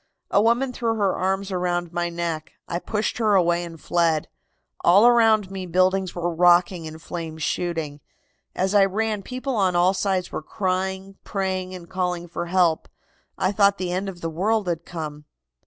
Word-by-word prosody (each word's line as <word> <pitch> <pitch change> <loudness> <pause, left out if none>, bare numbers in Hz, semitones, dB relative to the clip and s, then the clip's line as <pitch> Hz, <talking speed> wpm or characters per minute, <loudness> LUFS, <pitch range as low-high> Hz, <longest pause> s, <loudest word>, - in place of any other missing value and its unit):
A 200 - +4
woman 240 +4 +2
threw 230 -2 -1
her 200 -3 +1
arms 195 +1 -1
around 175 -2 -1
my 175 0 -1
neck. 170 -2 -4
I 170 - -2
pushed 215 +5 -2
her 215 -3 +3
away 175 -2 +3
and 165 -2 -9
fled. 165 -3 +1 0.6
All 195 +6 +6
around 225 -5 +4
me 190 -1 -5
buildings 185 +2 +1
were 175 0 -2
rocking 175 0 +3
and 155 0 -9
flames 160 -2 -6
shooting. 160 -5 -2 0.5
As 190 +2 0
I 205 -1 +6
ran 210 +2 -1
people 255 +5 -4
on 190 -4 +2
all 180 +2 +4
sides 190 -2 -1
were - - -4
crying, 190 +2 -3
praying 185 -2 -3
and 175 -2 -10
calling 180 -2 -2
for 170 +1 -5
help. 175 -3 +2 0.5
I 185 - +1
thought 200 0 +3
the 180 -1 -3
end 190 +2 -2
of 175 -2 -10
the 165 - -2
world 205 +5 0
had 170 -1 -2
come. 150 -3 -6
185 Hz, 175 wpm, -23 LUFS, 170-195 Hz, 0.6 s, All